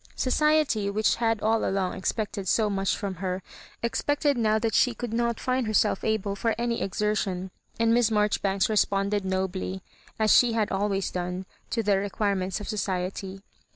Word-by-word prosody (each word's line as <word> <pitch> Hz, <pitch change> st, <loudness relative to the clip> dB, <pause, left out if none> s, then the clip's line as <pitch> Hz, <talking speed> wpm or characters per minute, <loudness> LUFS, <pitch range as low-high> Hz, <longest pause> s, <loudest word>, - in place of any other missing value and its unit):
Society, 285 Hz, -6 st, +2 dB
which 210 Hz, +1 st, +1 dB
had 225 Hz, -2 st, +1 dB
all 220 Hz, +1 st, +2 dB
along 190 Hz, -1 st, 0 dB
expected 200 Hz, 0 st, -3 dB
so 215 Hz, +2 st, +2 dB
much 195 Hz, -1 st, 0 dB
from 195 Hz, -4 st, -4 dB
her, 185 Hz, -1 st, -2 dB, 0.4 s
expected 290 Hz, +4 st, +1 dB
now 220 Hz, -2 st, +2 dB
that 220 Hz, 0 st, -1 dB
she 245 Hz, -2 st, +3 dB
could 235 Hz, 0 st, -5 dB
not 235 Hz, 0 st, 0 dB
find 255 Hz, -2 st, 0 dB
herself 215 Hz, -2 st, +2 dB
able 210 Hz, -2 st, 0 dB
for 225 Hz, +3 st, 0 dB
any 235 Hz, 0 st, -1 dB
exertion; 195 Hz, -2 st, -1 dB, 0.3 s
and 230 Hz, 0 st, +3 dB
Miss 240 Hz, -1 st, +4 dB
Marjori 210 Hz, -1 st, +1 dB
banks 195 Hz, -1 st, +1 dB
responded 200 Hz, -1 st, +1 dB
nobly, 190 Hz, 0 st, -2 dB, 0.3 s
as 215 Hz, -1 st, +4 dB
she 240 Hz, -2 st, +5 dB
had 220 Hz, -2 st, 0 dB
always 195 Hz, 0 st, 0 dB
done, 180 Hz, +1 st, -3 dB, 0.2 s
to 230 Hz, -, -1 dB
the 200 Hz, -2 st, +3 dB
requirements 195 Hz, -2 st, -1 dB
of 210 Hz, -, -7 dB
society. 190 Hz, -1 st, -3 dB
210 Hz, 165 wpm, -26 LUFS, 195-225 Hz, 0.4 s, she